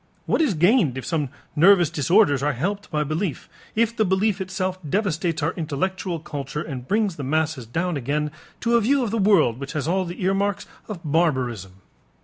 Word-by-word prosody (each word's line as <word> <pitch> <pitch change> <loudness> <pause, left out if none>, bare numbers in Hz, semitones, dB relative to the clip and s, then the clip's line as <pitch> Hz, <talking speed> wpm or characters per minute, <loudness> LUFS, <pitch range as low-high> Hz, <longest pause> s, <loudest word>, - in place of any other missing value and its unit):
What - - +1
is 270 - +2
gained 175 - +3
if 130 - -5
some 150 -5 -1 0.3
nervous 175 0 +5
disorders 155 - +3
are 145 +1 +1
helped 195 +11 -3
by 150 -1 0
belief, 155 +2 -3 0.3
if 230 +1 +1
the 220 - +2
belief 195 +1 +1
itself 185 0 -3
devastates 170 -1 -1
our 165 +4 +1
intellectual 175 +3 -2
culture 150 -2 -5
and 130 -5 -7
brings 205 -4 +1
the 145 - -5
masses 155 -3 -1
down 165 +6 -1
again 145 +3 -1 0.3
to 235 0 +2
a - - +2
view 265 +4 +2
of 225 - -2
the 225 - 0
world 175 - +4
which 140 0 -6
has 150 -1 -2
all 185 +2 +1
the 175 +2 -6
earmarks 195 +1 0 0.2
of 205 -6 -6
barbarism? 125 - 0
170 Hz, 185 wpm, -23 LUFS, 145-195 Hz, 0.3 s, nervous